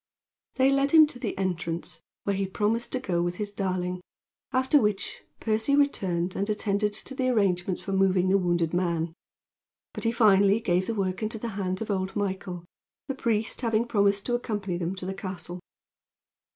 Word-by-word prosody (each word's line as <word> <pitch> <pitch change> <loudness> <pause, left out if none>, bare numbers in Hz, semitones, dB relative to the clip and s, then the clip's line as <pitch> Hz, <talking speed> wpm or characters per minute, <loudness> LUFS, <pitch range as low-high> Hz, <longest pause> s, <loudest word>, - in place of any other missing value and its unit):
They 265 +1 +4
led 275 +1 +2
him 315 +1 +8
to 285 -4 -8
the 230 -5 -3
entrance, 170 -3 -3 0.2
where 200 - 0
he 195 0 -1
promised 215 +5 -1
to 255 - 0
go 180 -9 -1
with 175 +1 -1
his 205 +1 -4
darling, 180 -2 -2 0.5
after 260 +3 +3
which 210 -2 -1 0.2
Percy 220 +5 +1
returned 185 -11 +1
and 200 +2 -1
attended 210 0 +1
to 270 - -6
the 255 -1 0
arrangements 190 -6 +1
for 195 - -5
moving 190 -1 +3
the 195 +1 +4
wounded 175 -2 0
man; 170 -2 0 0.8
but - - -5
he 230 - +2
finally 205 -3 +5
gave 185 -4 +1
the 230 - -1
work 190 -1 -1
into 220 +1 -2
the 230 +2 -4
hands 195 -1 -2
of 215 - -4
old 190 -1 -2
Michael, 190 -3 -3 0.4
the 270 - -1
priest 225 -4 -1
having 230 -1 +1
promised 200 -3 +2
to 245 - -1
accompany 205 -6 -2
them 175 +2 -2
to 185 - -7
the 190 - -3
castle. 185 -2 -6
200 Hz, 180 wpm, -27 LUFS, 185-225 Hz, 0.8 s, him